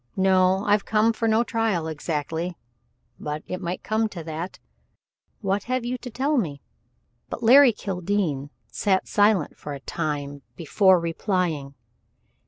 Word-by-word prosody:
No, 190 0 +3
I've 205 0 +3
come 220 +1 +2
for 225 +1 -1
no 220 +1 +3
trial 225 -8 0
exactly 160 +2 -3 0.6
maybe 150 +1 -4
it 185 - -4
might 175 0 -4
come 220 0 0
to 175 -5 -7
that? 165 +3 -5 0.8
What 200 0 -1
have 255 0 -1
you 245 +1 -1
to 250 - -7
tell 275 +5 0
me?" 150 -9 -3 0.7
But 235 - -6
Larry 260 +3 +8
Kildene 180 -8 -2 0.2
sat 190 - +1
silent 205 -6 +2
for 145 -1 -6
a - - -8
time 145 -2 -4
before 185 +3 +4
replying. 165 -4 -2
185 Hz, 140 wpm, -24 LUFS, 160-220 Hz, 0.8 s, Larry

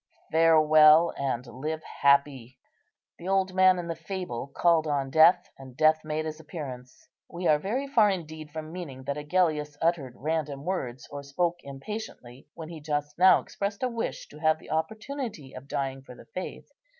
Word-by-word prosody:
"Farewell, 155 0 +6
and 130 -3 -2
live 155 +6 -5
happy." 140 -3 +1 0.6
The 175 - -8
old 190 -1 +1
man 185 0 +5
in 175 -1 -4
the 165 - -3
fable 165 -7 -5
called 160 +2 +2
on 140 -2 -1
Death, 170 +4 +6
and 130 -2 -12
Death 155 +1 +4
made 155 0 -3
his 155 0 -5
appearance. 135 -6 -9 0.2
We 175 +1 -6
are 155 -2 +4
very 235 - -2
far 225 -6 +4
indeed 160 -5 -5
from 155 +1 -7
meaning 150 -7 -7
that 140 +1 -3
Agellius 150 -1 0
uttered 165 -7 0
random 150 -1 -3
words, 135 -9 -4
or 145 0 -6
spoke 170 +5 -1
impatiently, 135 - -8
when 160 -1 -8
he 165 -2 -9
just 150 0 -3
now 185 +1 +7
expressed 200 +3 -4
a 255 - +1
wish 230 -1 -4
to 150 - -13
have 155 0 +3
the - - -13
opportunity 215 - -4
of 130 +1 -10
dying 135 -1 -3
for 125 -2 -13
the - - -15
Faith. 185 - -7
155 Hz, 175 wpm, -27 LUFS, 140-175 Hz, 0.6 s, now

